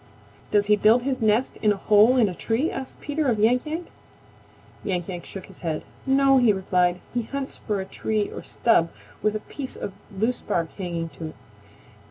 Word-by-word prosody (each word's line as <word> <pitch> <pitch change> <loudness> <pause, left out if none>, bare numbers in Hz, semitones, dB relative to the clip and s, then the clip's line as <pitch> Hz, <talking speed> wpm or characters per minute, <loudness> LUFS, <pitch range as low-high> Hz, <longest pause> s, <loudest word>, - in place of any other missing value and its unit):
"Does 205 -1 +3
he 210 0 +5
build 220 +4 +4
his 260 -1 -1
nest 220 +3 +2
in 215 - +3
a - - +1
hole 215 +5 +5
in 230 -4 +5
a 185 - -3
tree?" 230 - 0
asked 265 -1 -7
Peter 300 0 -1
of 235 -4 +2
Yank 245 +6 +3
Yank. 325 +3 -3 1.0
Yank 180 -4 -2
Yank 175 -3 -6
shook 195 - -8
his 190 - -14
head. 160 -3 -3 0.2
"No," 270 0 +5
he 240 -3 +5
replied. 180 -2 +1
"He 245 - +1
hunts 275 +4 -5
for 210 -3 -2
a 190 - -3
tree 210 +2 -1
or - - -6
stub 170 -8 +2 0.3
with 215 0 +1
a - - -1
piece 270 +3 -6
of 195 - -5 0.2
loose 220 +5 0
bark 165 -2 -2
hanging 170 -4 -3
to 150 +2 -8
it. 155 - -10
215 Hz, 200 wpm, -25 LUFS, 190-250 Hz, 1.0 s, he